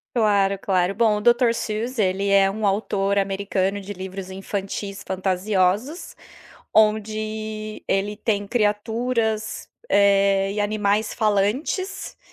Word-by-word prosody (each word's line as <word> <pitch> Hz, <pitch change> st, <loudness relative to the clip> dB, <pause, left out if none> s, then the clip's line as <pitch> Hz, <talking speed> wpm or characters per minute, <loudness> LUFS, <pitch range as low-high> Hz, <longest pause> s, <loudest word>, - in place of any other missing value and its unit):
Claro, 200 Hz, -3 st, +2 dB
claro 185 Hz, -1 st, +1 dB
bom, 215 Hz, -1 st, +2 dB
o -, -, -7 dB
Dr. 240 Hz, 0 st, +4 dB
Seuss 230 Hz, +3 st, -3 dB
ele 195 Hz, -1 st, +1 dB
é 195 Hz, -1 st, +4 dB
um 215 Hz, 0 st, -1 dB
autor 200 Hz, 0 st, 0 dB
americano 195 Hz, 0 st, 0 dB
de 200 Hz, +1 st, -7 dB
livros 190 Hz, 0 st, -7 dB
infantis 195 Hz, +1 st, -5 dB
fantasiosos, 190 Hz, -, -1 dB, 0.6 s
onde 215 Hz, 0 st, 0 dB
ele 205 Hz, +2 st, 0 dB
tem 205 Hz, -3 st, -1 dB
criaturas, 220 Hz, 0 st, -1 dB, 0.2 s
eh, 195 Hz, -1 st, +3 dB
e 210 Hz, -, -3 dB
animais 210 Hz, 0 st, 0 dB
falantes. 220 Hz, -, -1 dB
205 Hz, 110 wpm, -23 LUFS, 195-220 Hz, 0.6 s, Dr